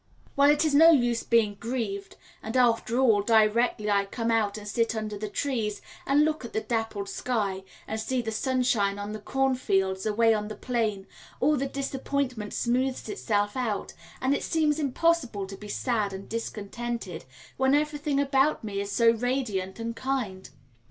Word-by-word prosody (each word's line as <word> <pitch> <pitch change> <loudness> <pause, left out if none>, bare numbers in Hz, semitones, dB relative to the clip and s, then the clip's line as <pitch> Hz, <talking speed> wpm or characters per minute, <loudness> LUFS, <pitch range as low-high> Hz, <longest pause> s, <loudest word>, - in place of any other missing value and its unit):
Well, 280 +1 +5
it 295 +2 +4
is 305 - +1
no 325 +3 +8
use 240 -7 +3
being 225 -3 +2
grieved, 220 -5 -4 0.3
and 220 +4 -3
after 235 -1 +2
all, 230 -6 +4
directly 220 +1 +3
I 200 -1 +2
come 230 +3 -2
out 215 -2 +1
and 210 -1 -9
sit 230 +2 0
under 215 -1 -3
the 210 +1 -5
trees, 220 -3 -2 0.3
and 290 +2 +4
look 310 -2 -1
at 235 - -8
the 220 - 0
dappled 225 -4 -2
sky, 200 -5 -2 0.2
and 220 - -3
see 255 +4 -1
the 225 -2 -2
sunshine 240 -5 +1
on 205 +1 -5
the 215 - -5
cornfields 205 -7 0
away 225 +1 +4
on 210 -1 -2
the 215 - -6
plain, 220 -6 -2 0.3
all 300 +3 +3
the 275 0 -1
disappointment 270 -4 -3
smooths 255 +2 0
itself 205 - -1
out, 230 -6 -2 0.3
and 260 +1 +2
it - - -1
seems 310 -2 +1
impossible 275 -7 +1
to 195 +1 -8
be 210 +2 -10
sad 210 -2 -1
and 190 +1 -8
discontented 225 -4 -5 0.3
when 265 +1 +3
everything 295 -1 0
about 275 0 +2
me 200 -2 -3
is 200 0 -5
so 230 +3 +5
radiant 230 -5 -2
and 230 0 -4
kind. 240 -8 -3
230 Hz, 170 wpm, -27 LUFS, 210-265 Hz, 0.3 s, no